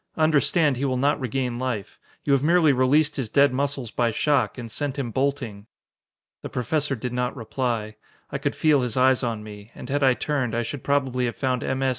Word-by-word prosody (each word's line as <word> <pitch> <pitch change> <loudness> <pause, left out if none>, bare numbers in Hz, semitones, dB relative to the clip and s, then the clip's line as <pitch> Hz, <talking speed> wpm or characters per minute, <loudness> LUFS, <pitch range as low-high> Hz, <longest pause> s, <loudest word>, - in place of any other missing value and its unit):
Understand, 155 -2 +3
he 140 - -1
will 130 -2 0
not 145 +3 +2
regain 125 -1 -2
life. 125 -6 -4 0.2
You 140 - +2
have 135 - +3
merely 160 -1 +4
released 135 +4 +2
his 130 -5 -2
dead 140 +1 +4
muscles 135 -3 -2
by 120 -1 +1
shock, 130 0 +1
and 115 -3 -7
sent 145 +4 -3
him 125 -4 -3
bolting." 120 -6 -2 0.7
The - - -6
Professor 140 +3 -1
did 125 +1 -5
not 125 0 -1
reply. 115 -3 -3 0.3
I - - -3
could - - -2
feel 150 -3 +3
his 125 -1 -2
eyes 130 0 +4
on 115 -4 -3
me, 105 0 -11
and - - -9
had 145 +1 0
I 130 -2 +4
turned, 130 -7 -1
I 120 - 0
should 130 +4 -6
probably 130 -3 +1
had 120 - -3
found 130 -3 -1
M. 130 0 -1
S. 135 - +2
130 Hz, 210 wpm, -24 LUFS, 120-140 Hz, 0.7 s, merely